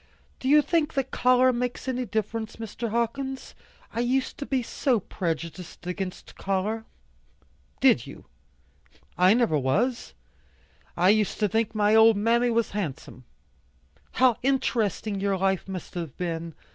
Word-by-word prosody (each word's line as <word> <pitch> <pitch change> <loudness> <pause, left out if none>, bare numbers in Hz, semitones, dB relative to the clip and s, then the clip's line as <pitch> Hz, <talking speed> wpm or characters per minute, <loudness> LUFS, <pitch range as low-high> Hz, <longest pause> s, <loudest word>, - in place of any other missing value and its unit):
Do 260 - -2
you 300 +1 +6
think 320 -2 0
that 270 -1 -1
color 255 +1 +4
makes 245 +1 -3
any 255 -1 -1
difference, 220 +2 -3
Mr. 230 +1 -5
Hawkins? 260 +4 -3 0.4
I 230 - -3
used 255 +2 0
to 280 - -5
be 260 -2 0
so 245 0 0
prejudiced 170 -1 -5
against 185 0 -5
color." 200 +4 -2 1.0
"Did - - +4
you? - - -11 0.9
I 185 +4 +5
never 230 -11 +2
was. 225 - -1 0.8
I 180 +2 +4
used 210 0 +2
to 210 - +3
think 220 +2 -1
my 210 0 +3
old 220 -1 +6
mammy 235 +3 +2
was 230 -1 0
handsome." 150 -9 -5 0.9
"How 250 -2 +4
interesting 225 -6 0
your 195 0 0
life 190 0 0
must 185 -3 -7
have 165 -6 -6
been! 165 -2 -4
220 Hz, 140 wpm, -26 LUFS, 190-250 Hz, 1.0 s, you